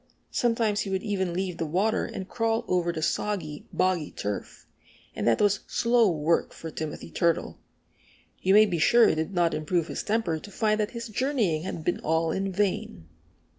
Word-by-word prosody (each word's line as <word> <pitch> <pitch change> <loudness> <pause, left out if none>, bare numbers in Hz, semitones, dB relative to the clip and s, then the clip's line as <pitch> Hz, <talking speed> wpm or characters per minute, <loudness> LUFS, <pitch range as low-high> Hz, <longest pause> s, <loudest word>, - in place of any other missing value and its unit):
Sometimes 230 -3 +1
he 205 - -2
would 190 0 -1
even 190 -4 -1
leave 180 0 -3
the 165 - -2
water 195 +8 +1
and 190 - -6
crawl 225 +1 0
over 175 -1 +1
the 160 -2 -4
soggy, 165 -6 -2
boggy 185 -4 +1
turf; 100 0 -5 0.5
and - - -2
that 115 - +4
was 205 0 +3
slow 235 -2 +3
work 165 0 +1
for 160 - -8
Timothy 155 -1 -6
Turtle. 170 -2 0 0.8
You 190 +2 +4
may 215 +1 +8
be 175 -5 -2
sure 235 +9 +6
it - - +2
did 160 +5 -2
not 170 -1 +2
improve 160 +2 -1
his - - -3
temper 205 -7 0
to 205 - -12
find 215 +2 +1
that 210 0 0
his 235 0 -5
journeying 220 - 0
had 165 - -5
been 175 - 0
all 160 +1 +1
in 195 +3 -1
vain. 185 - -2
185 Hz, 185 wpm, -27 LUFS, 165-215 Hz, 0.8 s, may